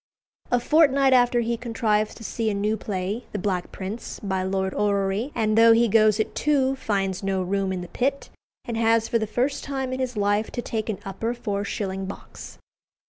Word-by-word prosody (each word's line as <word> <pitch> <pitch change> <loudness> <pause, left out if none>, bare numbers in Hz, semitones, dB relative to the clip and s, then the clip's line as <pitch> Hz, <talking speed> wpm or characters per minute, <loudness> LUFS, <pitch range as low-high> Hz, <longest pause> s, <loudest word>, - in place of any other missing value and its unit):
A 245 - +3
fortnight 275 -1 +4
after 245 -1 +4
he 235 0 -1
contrives 220 -3 0
to - - -11
see 225 +1 -2
a 205 - -1
new 210 +2 0
play, 200 +2 -4
"The - - -1
Black 185 -2 -2
Prince," 200 +5 -6
by 190 -2 -2
Lord 190 0 -1
Orrery; 200 +4 0
and 215 -1 +1
though 230 0 +7
he 235 +1 +4
goes 215 0 +4
at 220 - -1
two, 270 -3 +1
finds 195 -7 -1
no 195 -1 -1
room 195 +1 -1
in 185 -1 -3
the 180 - -7
pit, 270 +9 -2 0.3
and 235 -2 -3
has 225 0 +3
for 230 - +1
the 220 - -2
first 255 +6 -1
time 265 -2 -3
in 260 - -3
his 250 -3 -2
life 205 +1 +1
to 240 - -2
take 220 -1 -3
an 210 - -2
upper 225 +5 -3
four 205 -4 -3
shilling 195 -1 -3
box. 200 - -10
220 Hz, 200 wpm, -24 LUFS, 195-240 Hz, 0.3 s, though